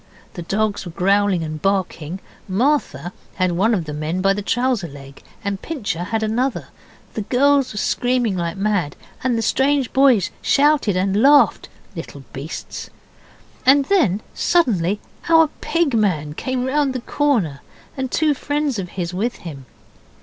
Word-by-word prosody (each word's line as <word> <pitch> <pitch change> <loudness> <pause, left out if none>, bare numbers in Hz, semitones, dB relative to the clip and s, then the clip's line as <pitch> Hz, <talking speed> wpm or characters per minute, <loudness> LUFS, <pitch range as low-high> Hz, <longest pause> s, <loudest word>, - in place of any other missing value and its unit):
The 175 - -6
dogs 205 +4 -1
were 175 - -7
growling 195 0 +2
and 155 -1 -5
barking 190 -3 -1 0.3
Martha 210 - 0 0.2
had 185 -1 +1
one 205 +7 +2
of 175 -5 -2
the 150 - -6
men 155 +4 -2
by 195 +1 +3
the 205 - -3
trouser 245 -3 0
leg 140 -2 -12 0.2
and 200 -1 -3
Pincher 205 - -3
had 220 +2 -1
another; 240 +4 -1 0.4
the 220 - -3
girls 275 +5 +2
were 210 - -8
screaming 245 -1 0
like 170 -1 -3
mad 195 -7 0 0.3
and 245 -2 +1
the 225 - -1
strange 270 +2 +1
boys 260 -8 +4
shouted 280 -9 +3
and 195 +3 +1
laughed 285 +2 +5 0.3
(little - - -8
beasts!), - - -7 0.7
and 275 +1 +5
then 250 - +2
suddenly 210 - +1 0.3
our 325 -2 +6 0.2
Pig 335 -5 +2
man 170 -10 +1
came 255 +8 -2
round 275 0 +1
the 255 - -4
corner, 230 - 0 0.3
and 265 -1 -3
two 305 -1 +2
friends 290 -3 -2
of 180 -2 -5
his 175 -1 -3
with 225 +7 -1
him. 140 -6 -8
210 Hz, 155 wpm, -20 LUFS, 180-265 Hz, 0.7 s, our